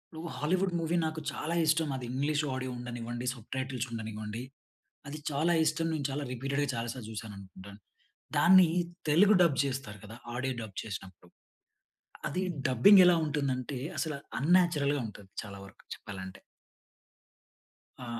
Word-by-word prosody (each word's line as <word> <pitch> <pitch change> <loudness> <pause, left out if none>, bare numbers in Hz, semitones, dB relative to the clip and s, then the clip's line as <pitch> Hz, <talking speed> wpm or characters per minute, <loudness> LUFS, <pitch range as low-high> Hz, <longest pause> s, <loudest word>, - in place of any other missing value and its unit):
నువ్వు 165 +1 -6
Hollywood 180 +4 0
movie 165 +2 0
నాకు 160 0 -4
చాలా 165 +3 -3
ఇష్టమది. 150 -5 +1
ఇంగ్లీష్ 145 +3 0
ఆడియో 130 0 -3
ఉండనివ్వండి, 120 0 -5
సబ్‌టైటిల్స్ 130 +1 -4
ఉండనివ్వండి. 110 0 -5 0.7
అది 150 +2 -6
చాలా 155 +4 +1
ఇష్టం, 155 +1 0
నేను 145 -3 -1
చాలా 145 +2 -3
రిపీటెడ్‌గా, 140 +3 -1
చాలా 115 +1 -3
సార్లు 120 -4 -8
చూసాననుకుంటాను. 100 -2 -9 0.6
దాన్ని 185 0 +7 0.4
తెలుగు 195 +8 +6
డబ్ 155 -6 +3
చేస్తారు 130 -6 -4
కదా! 110 - -10 0.2
ఆడియో 130 +2 -1
డబ్ 105 -3 -9
చేసినప్పుడు. 95 -4 -8 1.0
అది, 185 - -2 0.3
డబ్బింగ్ 160 - +7
ఎలా 180 -1 +6
ఉంటుందంటే, 140 -3 -2 0.2
అసల 160 -2 -1 0.3
అన్‌నాచురల్‌గా 150 -2 +3
ఉంటది. 100 -2 -12
చాలా 100 -2 -9
వరకు 100 +4 -17
చెప్పాలంటే. 95 -2 -8 1.6
ఆ! 125 - -7
135 Hz, 130 wpm, -30 LUFS, 115-155 Hz, 1.6 s, దాన్ని